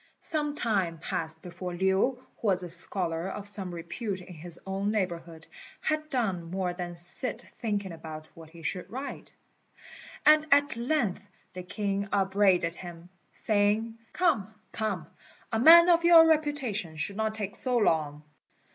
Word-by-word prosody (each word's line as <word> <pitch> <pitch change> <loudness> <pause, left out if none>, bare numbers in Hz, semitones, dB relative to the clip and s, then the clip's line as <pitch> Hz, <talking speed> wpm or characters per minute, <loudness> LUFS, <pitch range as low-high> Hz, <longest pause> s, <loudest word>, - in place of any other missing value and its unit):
Some 295 -2 -2
time 195 - 0
passed 160 0 -4
before 180 0 -6
Lin, 190 +2 +2
who 245 +7 +1 0.2
was 190 -5 +1
a 175 - -6
scholar 170 0 0
of 205 +1 -6
some 195 -3 -4
repute 190 +4 -5
in 180 0 -11
his 170 +1 -3
own 195 +1 -2
neighbourhood, 170 -5 -3 0.3
had 310 0 -2
done 190 - -1
more 185 0 -2
than 175 -1 -6
sit 175 +8 +1
thinking 205 -5 -2
about 155 -1 -9
what 165 -1 -13
he 165 0 -14
should 180 +2 -4
write; 265 +4 -6 0.9
and 305 +1 +6
at 285 0 +4
length 235 -5 -1 0.3
the 180 - -6
king 200 +1 -3
upbraided 190 -3 +2
him, 175 -1 -10 0.2
saying, 215 +2 0
"Come, 310 - +1 0.2
come, 205 -7 -3 0.5
a 225 - 0
man 335 +6 +9
of 340 -1 +4
your 335 -1 +8
reputation 285 - 0
should 155 +6 -3
not 220 0 -1
take 205 -2 -4
so 250 -2 0
long." 155 -8 +1
195 Hz, 150 wpm, -28 LUFS, 175-235 Hz, 0.9 s, man